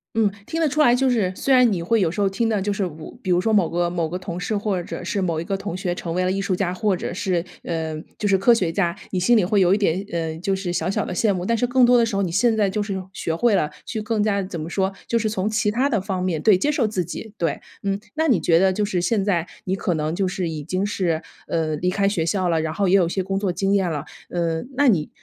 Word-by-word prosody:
嗯， 220 -3 +3 0.2
听 325 0 -3
得 325 - +3
出 300 +2 +1
来， 245 -5 +6
就 265 +1 +2
是 210 -7 +1
虽 270 - +1
然 250 -3 +6
你 175 -4 -1
会 220 +5 +2
有 175 - +2
时 180 - -5
候 200 - +3
听 225 +4 0
的 215 -2 +1
就 205 +1 0
是 200 - -3
如 160 -3 -7
比 - - -5
如 175 -1 +4
说 220 +4 +1
某 195 -5 +3
个 175 0 0
某 170 -2 -1
个 180 - -3
同 180 -1 -6
事 180 +4 -2
或 200 -3 -1
者 175 - -7
是 195 +2 -1
某 170 -4 0
一 - - -3
个 195 - -2
同 195 -2 -4
学 180 -1 -2
成 170 -1 -5
为 185 - +1
了 185 - +1
艺 195 +1 -1
术 195 -1 0
家， 180 -1 -1
或 200 +1 +1
者 - - -4
是， 180 -2 -1 0.2
呃 160 -2 -3 0.2
就 210 - -1
是 195 - +4
科 195 +5 +4
学 185 -8 +1
家， 170 -1 0 0.2
你 185 - 0
心 235 +7 +4
里 205 - +3
会 200 +1 +2
有 185 +1 +5
一 - - 0
点， 190 -2 +1
嗯， 165 -1 -3
就 195 +1 0
是 190 -2 -3
小 165 0 -1
小 195 - -1
的 - - -4
羡 205 +4 +2
慕， 180 -1 -3
但 230 - +1
是 245 +2 +1
更 250 0 +4
多 245 0 +5
的 235 - +4
时 225 -3 -3
候 200 - +1
你 180 - -2
现 220 +6 +3
在 210 -2 +2
就 210 +2 -1
是 205 -1 -3 0.2
学 165 - -2
会 235 +6 +2
了， 150 -6 +2 0.2
去 220 - -4
更 215 -1 0
加 200 -2 +1
怎 185 -3 -5
么 155 +2 -5
说？ 190 +2 0 0.2
就 235 - +1
是 220 -1 0
从 200 -2 -1
其 215 -1 +1
它 245 +6 +1
的 225 -8 0
方 190 -2 -3
面 170 -4 -1
对， 205 0 +5
接 290 +11 +1
受 275 -7 +1
自 195 -4 -1
己， 205 +5 -7
对， 165 -6 -1 0.2
嗯。 195 0 -1 0.2
那 320 +1 +1
你 240 - +4
觉 165 +1 +3
得 190 +2 +4
就 210 - -1
是 185 -4 -1
现 200 +3 +1
在 180 -5 +1 0.2
你 190 - 0
可 190 -2 -1
能 155 +1 -1
就 190 +1 0
是 180 -2 -2
已 155 -2 -5
经 185 +5 -1
是， 180 -6 -1 0.3
呃， 160 -2 -1
离 180 +4 0
开 195 +1 +1
学 175 -6 -1
校 185 +2 0
了， 165 -1 +2
然 160 0 -2
后 200 +4 0
也 185 - +4
有 190 -3 +5
一 - - -2
些 190 - -1
工 195 +1 -2
作 195 -2 0
经 195 +2 0
验 190 -4 +2
啦， 150 -3 -4 0.2
嗯， 170 +2 -2
那 285 +2 +3
你 170 -11 +2
190 Hz, 330 characters per minute, -22 LUFS, 175-210 Hz, 0.3 s, 来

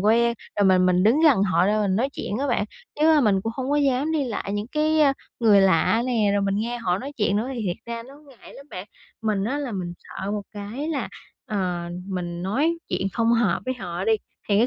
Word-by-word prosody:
quen 235 +3 +3 0.2
rồi 205 - +4
mình 185 -1 +5
mình 180 0 +3
đứng 235 +10 +4
gần 280 -11 +5
họ 185 -2 +3
ra 215 +1 +2
mình 195 -2 +1
nói 255 +5 +1
chuyện 205 - -4
á 280 - -1
bạn, 235 -5 +1 0.4
chứ, 310 - +5
a, 305 - +5
mình 205 -6 +3
cũng 225 - -3
hông 260 +1 -3
có 290 - +2
dám 280 +2 +1
đi 300 -3 +1
lại 210 -4 -4
những 205 +1 -2
cái, 310 +1 +2
a, 285 -2 +5 0.3
người 210 -4 +6
lạ 195 +4 +3
nè, 225 -5 +2
rồi 200 0 +1
mình 195 0 0
nghe 235 +3 -2
họ 180 -5 0
nói 275 +6 -6
chuyện 205 -2 +1
nữa 225 +5 -1
thì 235 - -4
thiệt 175 - -1
ra 235 0 -5
nó 265 +4 -14
ngại 255 - -15
lắm 275 - -12
bạn. 185 +2 -7 0.4
Mình 210 -3 0
á 265 +7 -1
là 280 -5 -4
mình 180 -3 -4
sợ 195 - -6
một 205 -1 -2
cái 215 +9 -5
là, 300 -4 -2 0.4
ờ, 180 -4 -2 0.2
mình 175 -2 -4
nói 290 - 0
chuyện 195 - -1
không 230 +2 +2
hợp 225 -7 +2
với 255 - -2
họ 180 -4 -5
đi, 225 - +3 0.4
thì 200 - +3
cái 235 - +4
215 Hz, 250 wpm, -24 LUFS, 195-255 Hz, 0.4 s, người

